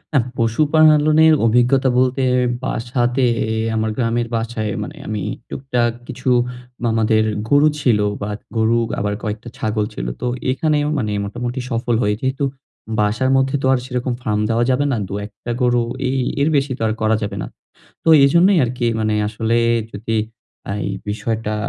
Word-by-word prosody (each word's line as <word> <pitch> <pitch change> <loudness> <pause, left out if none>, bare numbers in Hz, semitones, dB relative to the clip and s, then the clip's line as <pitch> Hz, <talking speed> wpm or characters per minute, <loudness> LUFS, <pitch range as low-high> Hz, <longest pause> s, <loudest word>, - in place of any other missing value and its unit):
আহ 135 - +4
পশুপালনের 155 +5 +4
অভিজ্ঞতা 125 +3 +3
বলতে 130 +1 +2 0.4
বাসাতে 125 +2 0 0.5
আমার 110 0 0
গ্রামের 120 -1 0
বাসায় 115 -2 -2
মানে - - -9
আমি 105 -1 -3 0.3
টুকটাক 125 -3 -1 0.2
কিছু 130 0 -4 0.5
মামাদের 110 -1 +2 0.2
গরু 145 +1 +5
ছিল 120 -7 +2 0.2
বা 100 - -3 0.3
গরু 110 +1 +3 0.2
আবার 105 0 -1
কয়েকটা 110 +2 -4
ছাগল 110 -1 -1
ছিল। - - -5
তো 125 - -1 0.2
এখানেও 150 +2 +1
মানে 105 -6 -1
মোটামুটি 120 +4 -4
সফল 120 0 0
হই। 105 0 +2
যেহেতু 130 +2 -1 0.5
বাসার 115 +5 +1
মধ্যে 135 +1 +1
তো - - -1
আর 130 - +1
সেরকম 125 -1 -2
ফার্ম 105 -4 -1
দেওয়া 115 +1 +2
যাবে 135 +3 +1
না। 125 - 0
২-১ 105 +2 -5
টা 120 - -2
গরু 120 -1 +3 0.3
এই 135 - 0 0.2
এর 145 - +3
বেশি 140 -1 +1
তো - - -12
আর 110 - 0
করা 110 0 +3
যাবে 105 - -4
না। - - -4 0.6
তো - - +1 0.2
এজন্যই 170 +7 +5
আরকি 120 0 -2
মানে 110 0 +1
আসলে 110 +2 -1 0.4
যদি 110 +2 -3 0.5
আ - - -1
এই 100 - -2 0.2
বিষয়টা 110 +1 -2
120 Hz, 160 wpm, -19 LUFS, 110-135 Hz, 0.6 s, গরু